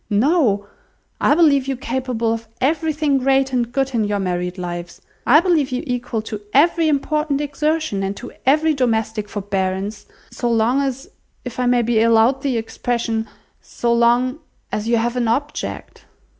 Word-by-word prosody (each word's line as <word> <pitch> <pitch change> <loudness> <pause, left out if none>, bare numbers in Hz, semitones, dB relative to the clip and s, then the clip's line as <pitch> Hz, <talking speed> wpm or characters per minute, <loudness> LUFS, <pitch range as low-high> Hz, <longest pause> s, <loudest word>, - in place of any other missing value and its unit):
No, 220 - +2 0.5
I - - +4
believe 285 -5 +4
you 270 -2 -2
capable 245 -2 -1
of 230 0 -6
everything 300 -1 +1
great 270 0 +2
and 240 -2 0
good 270 +1 -1
in 225 -2 +1
your 205 0 -1
married 180 -1 -2
lives. 175 -1 -6 0.3
I 295 +5 +7
believe 325 -7 +1
you 250 - -2
equal 245 -3 -3
to 215 -1 -6
every 330 +3 +4
important 300 0 0
exertion, 295 -5 -1
and 195 +1 -3
to 245 - -8
every 310 +4 +3
domestic 220 -5 -1
forbearance, 200 0 -3 0.2
so 240 - -2
long 230 +4 +2
as—if 270 - -7
I 250 - +1
may 245 -1 +3
be 225 -1 +2
allowed 230 +4 +4
the 265 -4 0
expression—so 230 0 -3
long 240 +4 +2 0.3
as 215 +1 -3
you 235 0 +3
have 240 +2 -1
an 240 -2 +1
object. 290 +6 -3
245 Hz, 155 wpm, -20 LUFS, 220-275 Hz, 0.5 s, I